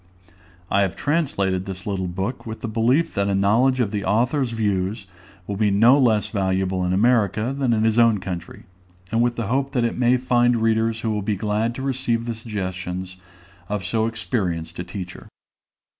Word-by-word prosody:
I 100 - +3
have 95 -3 0
translated 100 - 0
this 95 -1 -7
little 95 -3 -2
book, 95 +8 -4
with 110 0 -6
the - - -3
belief 120 +9 +1
that 100 0 0
a 100 - +1
knowledge 115 +7 +3
of 110 -5 +1
the 105 -2 -2
author's 125 +6 +1
views 100 -2 -1 0.4
will 100 +1 -4
be 105 0 +2
no 115 +8 +5
less 110 -5 +3
valuable 95 -2 0
in 90 - 0
America 110 +3 +2
than 135 -3 0
in 110 -1 +2
his 110 +1 +3
own 115 -3 +4
country; 90 -3 -6 0.5
and 115 +1 +2
with 120 0 +1
the 115 - -3
hope 135 +5 -1
that 120 -2 +1
it 115 - -2
may 125 +1 +4
find 120 -1 +2
readers 115 0 +1
who 115 - -1
will 105 -1 -1
be 105 +1 -1
glad 110 +3 -1
to 130 - -5
receive 125 -3 -1
the 120 - -2
suggestions 95 -4 -5 0.5
of 105 -1 -2
so 110 +5 0
experienced 100 -9 -3
a - - -2
teacher. 90 0 -8
110 Hz, 190 wpm, -22 LUFS, 95-120 Hz, 0.5 s, no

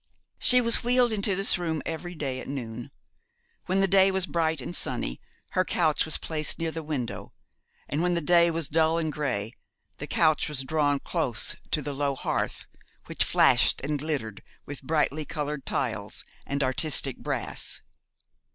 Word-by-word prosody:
She 250 0 +9
was 230 -1 +2
wheeled 245 0 +3
into 200 -2 +2
this 195 -1 +4
room 160 -3 -2
every 175 +2 -5
day 135 -4 -3
at - - -9
noon. 120 -3 -6 0.8
When 190 +1 +1
the 195 - +3
day 195 0 +5
was 190 -1 +1
bright 160 -1 0
and 135 +7 -5
sunny 60 - -2 0.3
her 185 - +1
couch 160 -4 +1
was 160 - -1
placed 155 -2 -2
near 165 -1 -2
the 160 - -5
window: 150 -6 -5 0.5
and 145 +4 -2
when 175 0 +1
the - - +1
day 170 +1 +4
was 165 -2 -1
dull 160 +2 +2
and 160 -2 -2
grey 120 -7 -3 0.5
the - - -5
couch 155 -2 +2
was 140 -3 -2
drawn 145 0 +1
close 145 -10 -2
to 150 - 0
the 145 - -4
low 140 0 -1
hearth, - - -3 0.4
which - - 0
flashed - - +3
and 145 +1 -2
glittered 135 -9 -4 0.2
with 145 -1 -8
brightly 155 +1 0
coloured 150 -2 -5
tiles - - -3 0.2
and 140 0 -1
artistic 135 0 +2
brass. - - -3
155 Hz, 170 wpm, -26 LUFS, 140-170 Hz, 0.8 s, She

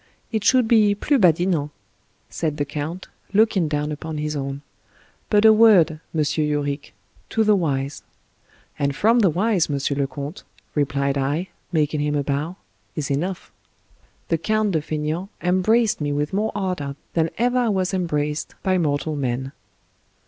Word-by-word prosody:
" - - -40
It 215 - 0
should 255 +1 +4
be 215 -3 +4
plus 275 +5 +1
badinant," 170 -3 +3 0.6
said 155 -3 -3
the 145 - 0
count, 150 +5 -5 0.3
looking 205 -5 +3
down 150 0 -1
upon 155 +1 -5
his 150 0 -2
own; 140 0 -4 0.3
" - - -33
but 210 +1 +4
a 220 - +9
word, 215 -7 +6 0.2
M. 155 -2 +1
Yorick, 145 -1 -1 0.3
to 225 - +2
the 210 -1 +4
wise 140 -6 -1 0.4
" - - -32
"And 140 -1 0
from 230 - +3
the 200 -5 +5
wise, 190 +1 +1
M. 145 - 0 0.2
le 140 - +1
Comte," 140 +5 -7 0.3
replied 140 -1 0
I, 150 +7 -1 0.2
making 150 -2 +1
him 150 0 0
a 145 - +1
bow, 145 +5 -2 0.2
" - - -41
is 145 -3 -3
enough." 175 +7 -3 0.8
The 165 - +1
Count 215 +1 +1
de 160 -4 +1
Faineant 155 +5 -3
embraced 190 +4 +2
me 145 0 -1
with 145 +4 -1
more 215 +3 0
ardor 180 -8 -2 0.2
than 165 -1 +1
ever 245 +2 +2
I 240 -2 +2
was 190 -2 0
embraced 150 -5 -2
by 185 -1 +2
mortal 150 -1 -1
man. 130 -1 -2
160 Hz, 170 wpm, -22 LUFS, 145-195 Hz, 0.8 s, a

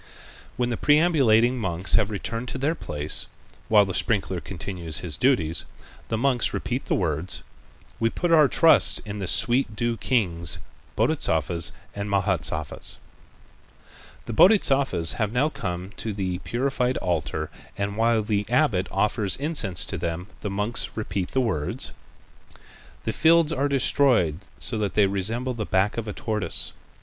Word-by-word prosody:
When 120 0 0
the 115 - -2
perambulating 135 -6 +3
monks 95 -3 0
have 110 -2 +3
returned 115 +4 -4
to 130 - -4
their 140 +5 0
place, 75 - 0 0.4
while 105 -2 +6
the 95 - -4
sprinkler 95 -5 -1
continues 85 -4 -5
his 85 -5 -4
duties, 85 - +1 0.4
the 115 - -2
monks 125 0 +1
repeat 125 +2 -3
the - - +1
words: 85 0 -2 0.6
"We 115 - +2
put 175 +8 -2
our 155 -3 +6
trust 165 +4 +5
in 105 0 -6
the 95 - -4
sweet 120 +1 +2
dew 120 +1 -1
kings, 85 - 0 0.4
Bodhisattvas 85 -3 +1 0.2
and 100 0 -5
Mahâsattvas." 90 -7 -1 1.3
The 115 - -5
Bodhisattvas 135 - +4
have 105 -1 0
now 130 +6 +1
come 90 - -5
to 110 - -4
the 95 -3 -3
purified 125 +6 -1
altar 80 -3 -2 0.3
and 100 0 -3
while 115 0 +2
the 105 -1 -2
abbot 120 -8 +2
offers 100 0 0
incense 140 - 0
to - - -4
them, 85 +1 -3
the 105 - -4
monks 105 +5 -1
repeat 100 -4 -3
the 130 - 0
words: 80 -12 -2 1.1
"The - - -2
fields 165 -1 +4
are 145 -1 0
destroyed 125 - +3 0.2
so 115 - -1
that 105 -2 -2
they 105 - +5
resemble 110 +7 -2
the 115 -3 -4
back 95 0 0
of 115 -1 -4
a 105 - -4
tortoise. 105 -6 0
105 Hz, 150 wpm, -24 LUFS, 95-125 Hz, 1.3 s, while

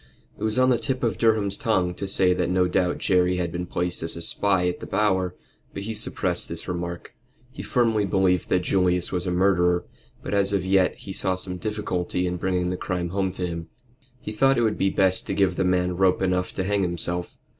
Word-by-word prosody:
It - - -9
was 110 +1 +1
on 130 0 +4
the 120 - +2
tip 130 -1 -2
of 115 - 0
Durham's 110 -4 +2
tongue 95 -6 +1
to 100 - -5
say 95 -1 +3
that 90 -1 -1
no 90 0 +2
doubt 90 0 0
Jerry 90 -1 +2
had 85 -2 -2
been 90 +1 -4
placed 90 0 -2
as 80 0 +2
a 85 - -6
spy 95 0 +1
at 90 - -2
the - - -8
Bower, 95 -4 +1 0.4
but 100 - -4
he 110 +2 -4
suppressed 105 - -1
this - - -7
remark. 85 -1 -5 0.4
He 135 - -8
firmly 115 -4 +1
believed 95 -2 +1
that 90 - +2
Julius 90 -1 +1
was 90 0 -2
a - - 0
murderer, 90 -1 +2 0.4
but - - -4
as 100 0 +2
yet 95 0 +2
he 95 - -8
saw 95 -1 0
some 90 0 -2
difficulty 90 -3 -2
in 90 0 -2
bringing 90 0 -1
the 90 - -3
crime 90 -1 -3
home 95 +1 -1
to 90 -1 -3
him. 85 -1 -5 0.5
He 105 - -6
thought 135 +5 +3
it 120 - +2
would 110 -2 0
be 95 - +2
best 95 -1 +1
to - - -2
give 95 -3 +2
the 95 - 0
man 90 -1 +1
rope 95 0 +2
enough 90 -1 0
to 95 - -1
hang 100 +1 0
himself. 85 0 -2
90 Hz, 220 wpm, -24 LUFS, 90-100 Hz, 0.5 s, on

